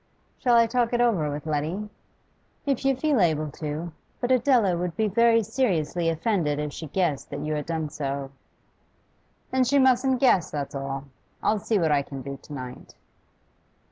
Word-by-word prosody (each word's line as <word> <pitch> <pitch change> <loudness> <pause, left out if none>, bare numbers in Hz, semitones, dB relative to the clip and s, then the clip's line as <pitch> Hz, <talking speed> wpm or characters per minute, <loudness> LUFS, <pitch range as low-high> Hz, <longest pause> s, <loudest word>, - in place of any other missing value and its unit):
'Shall 245 -2 +3
I 230 0 +6
talk 240 +1 0
it 240 - +2
over 210 -11 +2
with 145 +1 -5
Letty?' 160 +7 -2 0.8
'If 275 -3 0
you 270 0 +3
feel 285 -1 +1
able 155 -3 +1
to. 155 +4 -5 0.3
But 245 0 -1
Adela 245 -7 +4
would 175 -1 -3
be 220 - +2
very 230 +2 +4
seriously 180 - 0
offended 165 -3 0
if 150 -1 -3
she 160 - -6
guessed 160 -3 -1
that - - -5
you 155 - -1
had 150 0 -3
done 160 -2 -2
so.' 140 -1 -4 1.2
'Then 260 0 +3
she 270 +3 +2
mustn't 260 -1 +3
guess, 240 - +4
that's 145 -2 -4
all. 135 0 -4 0.4
I'll 215 - +2
see 215 +1 0
what 165 -5 +2
I 145 -1 +3
can 140 -1 -8
do 140 +1 -6
to - - -16
night. 125 -3 -8
175 Hz, 175 wpm, -26 LUFS, 150-235 Hz, 1.2 s, I